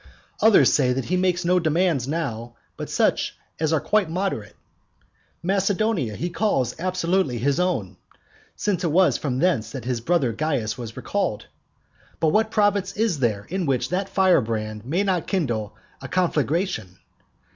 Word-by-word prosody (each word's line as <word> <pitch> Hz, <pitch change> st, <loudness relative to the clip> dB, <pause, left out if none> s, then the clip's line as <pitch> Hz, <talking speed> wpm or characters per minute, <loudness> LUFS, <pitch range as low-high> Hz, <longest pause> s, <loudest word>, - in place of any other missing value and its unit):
Others 220 Hz, -1 st, +6 dB
say 125 Hz, -3 st, +3 dB
that 130 Hz, -1 st, -2 dB
he 180 Hz, -, 0 dB
makes 180 Hz, -1 st, +1 dB
no 180 Hz, +1 st, +3 dB
demands 160 Hz, -5 st, +1 dB
now 120 Hz, -7 st, -3 dB, 0.2 s
but -, -, -6 dB
such -, -, +1 dB, 0.2 s
as 160 Hz, -1 st, +1 dB
are 160 Hz, -, +3 dB
quite 210 Hz, -1 st, +1 dB
moderate. 165 Hz, -, -3 dB, 0.9 s
Macedonia 195 Hz, -, 0 dB
he 175 Hz, -, -3 dB
calls 150 Hz, -, 0 dB
absolutely 180 Hz, -5 st, 0 dB
his 140 Hz, +7 st, 0 dB
own, 165 Hz, -, -1 dB, 0.6 s
since 195 Hz, -3 st, -1 dB
it 165 Hz, -, +1 dB
was 185 Hz, +3 st, +3 dB
from 130 Hz, -4 st, -2 dB
thence 155 Hz, -7 st, +1 dB
that 130 Hz, -4 st, -6 dB
his 125 Hz, -2 st, -2 dB
brother 135 Hz, -4 st, +1 dB
Caius 125 Hz, -6 st, -1 dB
was 115 Hz, -3 st, -8 dB
recalled. -, -, -2 dB, 0.7 s
But 160 Hz, -, +3 dB
what 220 Hz, +6 st, +2 dB
province 205 Hz, -2 st, +1 dB
is 215 Hz, -8 st, +1 dB
there 105 Hz, -5 st, 0 dB
in 185 Hz, -1 st, -2 dB
which 130 Hz, -3 st, 0 dB
that 190 Hz, +2 st, -1 dB
firebrand 115 Hz, -, +1 dB
may 175 Hz, +8 st, +1 dB
not 185 Hz, -4 st, 0 dB
kindle 120 Hz, -, -1 dB, 0.3 s
a 130 Hz, -, -6 dB
conflagration? 165 Hz, -, -1 dB
165 Hz, 155 wpm, -23 LUFS, 125-185 Hz, 0.9 s, Others